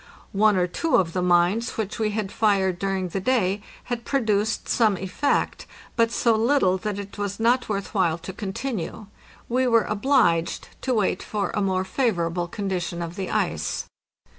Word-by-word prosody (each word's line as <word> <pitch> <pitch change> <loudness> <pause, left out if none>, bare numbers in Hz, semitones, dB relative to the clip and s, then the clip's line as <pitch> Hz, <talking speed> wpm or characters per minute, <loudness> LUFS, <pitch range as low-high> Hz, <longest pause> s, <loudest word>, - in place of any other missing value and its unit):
One 210 0 +4
or 180 - +3
two 315 - 0
of 165 -3 +2
the 180 - 0
mines 180 +6 +2
which 215 0 -3
we 215 -1 +1
had 210 -2 -3
fired 195 -4 +2
during 195 -2 -1
the 195 - -2
day 200 -3 +1 0.2
had 240 -1 -4
produced 220 -5 0
some 215 -5 +3
effect, 190 +10 -1 0.3
but 230 -1 +3
so 230 0 +2
little 220 -5 +3
that 210 0 -3
it 200 0 -8
was 200 0 -3
not 240 +2 +2
worth 200 -2 -3
while 175 -5 +2
to 170 +3 -8
continue. 210 0 -4 0.4
We 255 +2 +1
were 230 -2 +4
obliged 200 -7 +1
to 255 -2 0
wait 200 -4 +1
for 205 -2 -2
a 210 - -1
more 190 -1 0
favorable 175 -6 0
condition 180 -2 -3
of 170 0 -6
the 190 -1 -4
ice. - - -1
200 Hz, 170 wpm, -24 LUFS, 185-225 Hz, 0.4 s, One